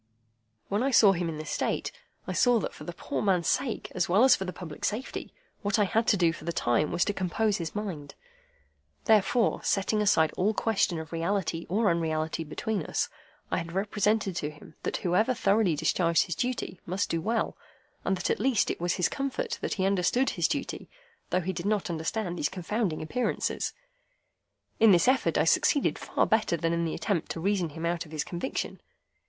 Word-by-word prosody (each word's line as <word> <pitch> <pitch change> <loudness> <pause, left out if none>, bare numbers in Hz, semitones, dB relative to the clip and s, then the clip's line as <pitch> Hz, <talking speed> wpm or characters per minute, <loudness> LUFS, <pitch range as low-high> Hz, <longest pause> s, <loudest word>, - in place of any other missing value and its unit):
When 205 +3 0
I 270 - +2
saw 220 -6 +7
him 175 -2 -1
in 155 - -5
this 155 - -6
state, - - -1 0.3
I - - -3
saw 245 -1 +4
that - - -4
for - - -10
the 175 - -4
poor - - -4
man's 185 -4 +2
sake, 255 -3 -1
as 180 -1 0
well 200 +7 +5
as 260 -1 +7
for 190 - -4
the 180 - -3
public 170 -5 -9
safety, 225 +5 -3 0.3
what 205 -2 +1
I 210 - +4
had 225 +4 +1
to 205 - +4
do 170 -2 +3
for 165 - -10
the 170 - -2
time 120 -1 +1
was 175 - +2
to 205 - 0
compose 200 +3 0
his 165 +1 -5
mind. 185 -9 -5 0.9
Therefore, 220 +2 +3
setting 210 +2 +1
aside 165 -6 +3
all 210 +4 +1
question 205 -6 +1
of 160 0 -8
reality 170 0 -1
or 210 +4 +2
unreality 160 -2 0
between 200 +7 -3
us, - - -1 0.4
I - - +1
represented 200 +3 0
to 150 - -2
him 150 +1 -14
that - - -2
whoever 215 +8 +2
thoroughly 200 -6 +2
discharged 170 +2 +2
his 175 - -3
duty 240 -3 -3
must 185 +3 -1
do 165 - 0
well, 225 +5 -1 0.5
and 190 - 0
that 180 - -1
at - - 0
least 255 -5 +2
it - - -6
was 175 0 +1
his 180 - +2
comfort 450 - -3
that - - -2
he 190 -2 0
understood 200 +7 +2
his - - +1
duty, - - -4 0.4
though 180 - +1
he 190 +2 -2
did 170 +3 -4
not 205 -4 0
understand 175 +3 -2
these 150 - +1
confounding 185 -2 -2
Appearances. 245 +10 -1 1.1
In 220 -3 +7
this 175 - +4
effort 260 +1 +3
I - - +4
succeeded 285 - +2
far - - 0
better 220 -6 +2
than 165 +1 0
in 170 0 0
the 160 - -2
attempt 170 0 -1
to - - -6
reason 185 -1 0
him 160 +3 -6
out 170 0 -1
of - - -16
his 155 -2 -2
conviction. 175 +9 -4
185 Hz, 200 wpm, -28 LUFS, 170-215 Hz, 1.1 s, saw